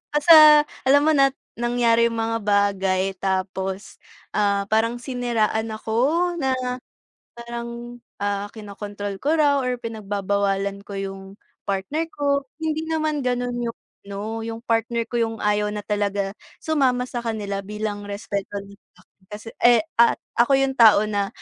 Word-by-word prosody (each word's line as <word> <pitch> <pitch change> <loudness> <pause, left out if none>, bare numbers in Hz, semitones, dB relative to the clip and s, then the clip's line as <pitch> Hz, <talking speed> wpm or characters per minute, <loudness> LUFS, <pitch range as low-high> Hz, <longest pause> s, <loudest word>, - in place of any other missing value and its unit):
nasa 315 +3 +7 0.5
alam 285 +2 +6
mo 315 - +5
nat 275 -2 +3 0.2
nangyari 235 -1 +3
yung 230 - -5
mga 225 0 0
bagay, 200 -2 +2 0.2
tapos 190 +1 -3 0.4
ah, 200 -1 +2
parang 230 +2 +2
siniraan 235 -3 -1
ako 220 +1 -4 0.4
na, 265 -3 0 0.9
parang, 235 0 -7 0.2
ah, 205 0 -2
kinakontrol 205 -1 -6
ko 300 +3 +1
raw 290 -2 +3
or 250 -1 -1
pinagbabawalan 200 -3 -2
ko 200 - -7
yung 195 0 -5 0.5
partner 200 +12 -1
ko. 280 -1 -1
Hindi 315 0 -2
naman 310 -2 -1
ganun 245 0 -1
yung 230 -1 -3 0.3
ano, 210 +3 -5
yung 230 0 -6
partner 230 0 0
ko 240 - -2
yung 225 -1 -1
ayaw 210 0 +1
na 210 - -4
talaga 200 -1 -1 0.3
sumama 265 -5 +1
sa 245 -1 -5
kanila 210 -4 -3
bilang 210 0 -5
respeto 200 -1 -4
nya 200 0 -14 0.2
sa'kin 195 - -27
kasi 210 +2 -9
eh, 240 +2 +6 0.2
at 235 - +5 0.2
ako 240 +4 +4
yung 270 0 +1
tao 220 -3 +7
na 205 -2 -1
225 Hz, 145 wpm, -23 LUFS, 200-245 Hz, 0.9 s, nasa